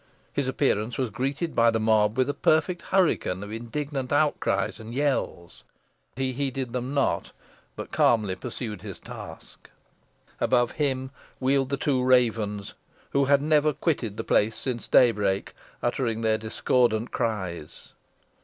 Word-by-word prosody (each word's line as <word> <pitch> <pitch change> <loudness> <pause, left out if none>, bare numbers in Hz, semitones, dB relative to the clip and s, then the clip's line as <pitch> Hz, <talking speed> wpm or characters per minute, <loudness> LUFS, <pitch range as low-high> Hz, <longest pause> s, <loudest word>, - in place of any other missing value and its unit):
His 140 -2 -1
appearance 125 -4 0
was 130 -4 -1
greeted 140 +6 -2
by 115 0 +5
the 115 -1 +1
mob 110 0 +2
with 130 0 +3
a 145 - 0
perfect 160 +4 +2
hurricane 155 - +1
of 100 - -8
indignant 130 +4 -4
outcries 145 -6 +1
and 110 +2 -8
yells. 135 -11 -2 0.5
But 130 - -5
he 130 -1 -1
heeded 135 -2 -3
them 125 +3 -3
not, 140 - 0 0.4
but - - -7
calmly 105 -5 +3
pursued 110 -4 -6
his 100 -3 -8
task. - - -11 0.7
Above 120 -2 +2
him 130 -3 -1 0.3
wheeled 135 0 +1
the 140 - -1
two 135 -1 +1
ravens, 115 -5 +1 0.4
who 140 0 +3
had 140 +1 +3
never 150 0 +3
quitted 125 - -1
the - - -3
place 110 +2 +2
since 125 -3 -4
daybreak, 105 -5 +3 0.3
uttering 120 -2 -1
their 110 -1 +1
discordant 115 +1 +1
cries. 95 -8 -4
125 Hz, 145 wpm, -26 LUFS, 110-140 Hz, 0.7 s, by